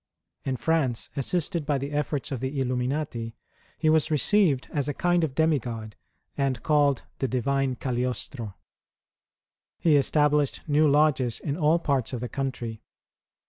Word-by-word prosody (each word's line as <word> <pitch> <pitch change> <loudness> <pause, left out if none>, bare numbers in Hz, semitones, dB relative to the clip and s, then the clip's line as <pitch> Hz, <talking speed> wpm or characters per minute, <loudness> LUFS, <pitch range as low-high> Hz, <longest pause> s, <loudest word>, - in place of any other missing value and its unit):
In 130 -1 -1
France, 140 -8 0
assisted 170 +4 -1
by 145 0 0
the 140 +2 -4
efforts 145 -1 -2
of 135 - -2
the 130 +3 -3
Illuminati, 125 -2 -2 0.4
he 160 - 0
was 155 0 +3
received 155 -2 +3
as 145 -2 0
a 145 - -2
kind 175 -1 +2
of 140 -5 -2
demigod, 120 -9 0 0.4
and 135 -4 -1
called 145 -3 +3 0.2
the 135 - 0
divine 130 +2 0
Cagliostro. 125 -3 -3 1.2
He 155 -3 +4
established 150 0 +2
new 150 +1 +4
lodges 140 -5 +3
in 140 - -3
all 160 0 +3
parts 140 -7 -1
of 125 - -2
the 125 +1 -4
country. 125 -5 -4
140 Hz, 140 wpm, -26 LUFS, 125-150 Hz, 1.2 s, He